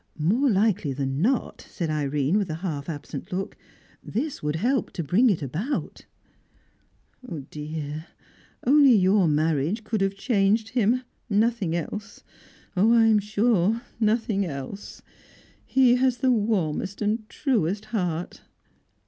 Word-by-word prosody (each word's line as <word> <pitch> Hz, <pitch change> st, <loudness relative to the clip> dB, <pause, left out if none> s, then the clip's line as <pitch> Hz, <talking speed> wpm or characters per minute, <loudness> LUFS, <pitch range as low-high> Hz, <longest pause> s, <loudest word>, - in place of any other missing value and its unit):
"More 215 Hz, -, +2 dB
likely 200 Hz, -, +1 dB
than 135 Hz, +1 st, -2 dB
not," 245 Hz, +6 st, 0 dB
said 165 Hz, -4 st, -3 dB
Irene, 145 Hz, +1 st, 0 dB
with 195 Hz, -4 st, -2 dB
a 155 Hz, -, -2 dB
half 145 Hz, -3 st, -4 dB
absent 145 Hz, -2 st, -7 dB
look, 190 Hz, +2 st, -3 dB, 0.5 s
"this 280 Hz, +6 st, -3 dB
would 150 Hz, 0 st, -1 dB
help 245 Hz, +10 st, 0 dB
to 170 Hz, -, -3 dB
bring 200 Hz, -, +3 dB
it 175 Hz, -7 st, 0 dB
about." 180 Hz, -, -4 dB, 1.4 s
"Dear, 150 Hz, +1 st, -6 dB, 0.6 s
only 280 Hz, 0 st, +6 dB
your 190 Hz, -1 st, +4 dB
marriage 155 Hz, -, +1 dB
could 215 Hz, -1 st, -2 dB
have 195 Hz, 0 st, 0 dB
changed 210 Hz, 0 st, +1 dB
him 245 Hz, +1 st, +1 dB, 0.3 s
nothing 210 Hz, -4 st, +1 dB
else. 200 Hz, +5 st, -6 dB, 0.5 s
Oh, 205 Hz, +5 st, +4 dB
I 230 Hz, -1 st, +5 dB
am 220 Hz, -1 st, +5 dB
sure, 215 Hz, +1 st, +1 dB, 0.2 s
nothing 215 Hz, -2 st, +1 dB
else! 145 Hz, +4 st, -7 dB, 0.6 s
He 255 Hz, -2 st, +4 dB
has 255 Hz, -1 st, +2 dB
the 260 Hz, +2 st, +2 dB
warmest 205 Hz, -4 st, -1 dB
and 215 Hz, +1 st, -1 dB
truest 215 Hz, -, -1 dB
heart!" 175 Hz, -5 st, -2 dB
200 Hz, 130 wpm, -25 LUFS, 160-230 Hz, 1.4 s, only